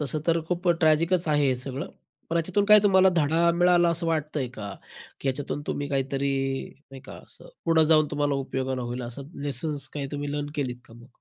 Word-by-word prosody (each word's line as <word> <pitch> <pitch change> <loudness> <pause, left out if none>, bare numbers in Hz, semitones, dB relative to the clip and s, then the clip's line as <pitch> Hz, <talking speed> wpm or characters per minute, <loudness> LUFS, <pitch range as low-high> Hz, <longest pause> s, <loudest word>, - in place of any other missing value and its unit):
तसं 150 +1 -2
तर 165 0 +2
खूप 180 0 -1
ट्रॅजिकच 165 +3 +3
आहे 145 -1 +3
हे 130 - +2
सगळं. 135 +5 -5 0.4
पण 170 - 0
याच्यातून 185 +5 +1
काय 210 +1 +8
तुम्हाला 190 -2 +5
धडा 165 +3 +3
मिळाला 175 0 +4
असं 170 0 -1
वाटतंय 155 -4 -1
का? 100 -5 -8 0.5
की 140 - -2
याच्यातून 145 +2 -3
तुम्ही 145 0 -3
काहीतरी 140 0 -1 0.6
नाही 135 -1 -10
का - - -11
असं - - -13 0.2
पुढं 165 -1 +4
जाऊन 155 -1 +5
तुम्हाला 145 -1 0
उपयोगाला 130 -1 -3
होईल 120 +1 -4
असं 120 +3 -6 0.2
लेसन्स 145 0 -2
काही 140 -2 -3
तुम्ही 145 0 -3
लर्न 145 0 -2
केलीत 130 -4 -2
का 115 - -16
मग? 120 +1 -15
145 Hz, 195 wpm, -26 LUFS, 135-165 Hz, 0.6 s, काय